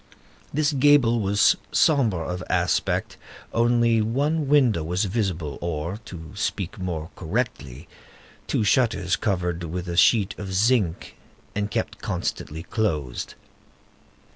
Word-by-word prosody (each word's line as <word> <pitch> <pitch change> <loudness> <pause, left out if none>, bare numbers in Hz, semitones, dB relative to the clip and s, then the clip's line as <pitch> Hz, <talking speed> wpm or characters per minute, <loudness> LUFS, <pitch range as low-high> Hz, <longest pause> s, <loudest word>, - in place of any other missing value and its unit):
This 150 +1 +1
gable 135 -4 +4
was 100 -1 +4 0.2
sombre 115 - +2
of 90 0 -4
aspect; 90 0 0 0.4
only 115 -1 +3
one 145 +7 0
window 130 - +3
was 90 +6 0
visible, 90 - -2
or, 85 +2 -3
to 80 -3 -9
speak 100 -1 -3
more 85 -4 -4
correctly, 85 - -4 0.6
two - - 0
shutters 105 -5 +2
covered 90 -5 -1
with 90 +2 -5
a 85 - -3
sheet 100 +1 +4
of 95 -2 -5
zinc 105 -5 +1 0.4
and 105 0 -2
kept - - -3
constantly 80 +2 -4
closed. 80 - -2
100 Hz, 115 wpm, -24 LUFS, 85-120 Hz, 0.6 s, gable